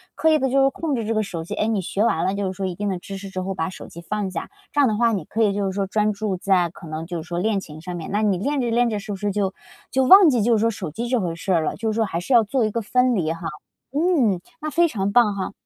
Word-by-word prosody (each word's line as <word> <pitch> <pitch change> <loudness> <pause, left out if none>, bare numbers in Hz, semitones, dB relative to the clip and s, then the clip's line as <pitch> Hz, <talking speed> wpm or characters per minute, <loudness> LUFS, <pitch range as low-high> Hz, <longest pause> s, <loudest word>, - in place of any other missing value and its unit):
刻 320 - +2
意 310 - +4
地 265 - +1
就 270 +1 +3
是 270 - +5
控 305 0 -2
制 230 -3 -2
这 225 - 0
个 215 - +1
手 180 -6 -5
机， 165 - -6
诶， 215 - 0
你 220 -3 0
学 195 +3 -1
完 165 -8 +1
了 190 - +1
就 200 -1 -2
是 185 - -3
说 190 +1 -4
一 185 - -2
定 205 +3 -3
的 190 - -2
知 195 +3 -8
识 195 0 -8
之 185 -1 -4
后 190 +1 -3
把 160 -4 -2
手 185 - -10
机 170 - -11
放 200 +2 -3
下。 165 - -5 0.2
这 290 - +2
样 275 - +5
的 215 - +1
话， 235 0 +3
你 195 -7 -2
可 225 +8 -1
以 205 -2 +2
就 200 0 -1
是 190 - -1
说 200 -1 0
专 210 +2 +1
注 205 -1 -2
在 185 -2 +2
可 170 -1 -12
能 155 +1 -5
就 170 -1 -4
是 160 - -12
说 175 - -4
练 205 +2 +1
琴 155 -4 -10
上 175 +2 -6
面， 165 -2 -6
那 205 +2 +1
你 200 -3 +2
练 280 +8 -1
着 240 -2 0
练 240 +1 +3
着 215 - -2
是 210 +1 -7
不 - - -2
是 205 +1 -2
就 195 -1 -1 0.4
就 265 - +2
忘 380 +3 +9
记 245 -5 +2
就 230 +1 +3
是 - - 0
说 230 - +3
手 190 -6 -5
机 235 +10 -4
这 250 0 +1
回 175 -5 -2
事 180 +3 -4
儿 165 -2 +2
了， - - -2
就 225 -1 -2
是 - - -3
说 225 0 +2
还 170 -4 -3
是 215 +9 -2
要 235 -2 +7
做 235 +2 0
一 215 - -1
个 230 - -2
分 250 +3 +2
离 165 -6 0
哈。 165 - -11 0.5
嗯， 280 - +2 0.2
那 305 - -3
非 340 +3 +3
常 200 -9 -2
棒 210 -2 +4
哈。 195 0 -3
205 Hz, 360 characters per minute, -22 LUFS, 185-235 Hz, 0.5 s, 忘